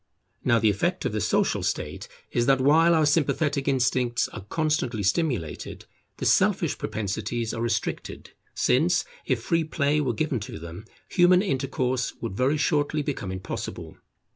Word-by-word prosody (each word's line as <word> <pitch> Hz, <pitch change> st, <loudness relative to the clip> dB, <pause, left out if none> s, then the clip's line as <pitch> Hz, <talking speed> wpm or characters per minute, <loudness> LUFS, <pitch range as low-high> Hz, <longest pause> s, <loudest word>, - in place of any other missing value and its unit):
Now 120 Hz, -2 st, +3 dB
the 110 Hz, -2 st, +3 dB
effect 100 Hz, -, -1 dB
of -, -, 0 dB
the -, -, -2 dB
Social -, -, +1 dB
state -, -, -3 dB, 0.2 s
is, 120 Hz, 0 st, +1 dB
that 135 Hz, -1 st, +4 dB
while 160 Hz, +5 st, +5 dB
our 155 Hz, -1 st, +3 dB
sympathetic 145 Hz, -2 st, +1 dB
instincts 125 Hz, -2 st, +1 dB
are 110 Hz, -, -9 dB
constantly 130 Hz, -5 st, -1 dB
stimulated, 100 Hz, -, -2 dB, 0.3 s
the -, -, -4 dB
selfish -, -, +2 dB
propensities 110 Hz, +2 st, -3 dB
are 115 Hz, -, -4 dB
restricted; 115 Hz, -3 st, -3 dB, 0.2 s
since, 170 Hz, +8 st, +2 dB, 0.2 s
if 125 Hz, -4 st, 0 dB
free 165 Hz, -1 st, +1 dB
play 150 Hz, -1 st, +1 dB
were 130 Hz, -4 st, 0 dB
given 140 Hz, 0 st, -1 dB
to 105 Hz, -, -7 dB
them, 85 Hz, +5 st, -9 dB, 0.2 s
human 180 Hz, +1 st, +4 dB
intercourse 130 Hz, -, -1 dB
would 115 Hz, -5 st, -5 dB
very 135 Hz, +7 st, +2 dB
shortly 150 Hz, 0 st, +1 dB
become 135 Hz, -10 st, -4 dB
impossible. 95 Hz, 0 st, -6 dB
130 Hz, 150 wpm, -26 LUFS, 115-150 Hz, 0.3 s, while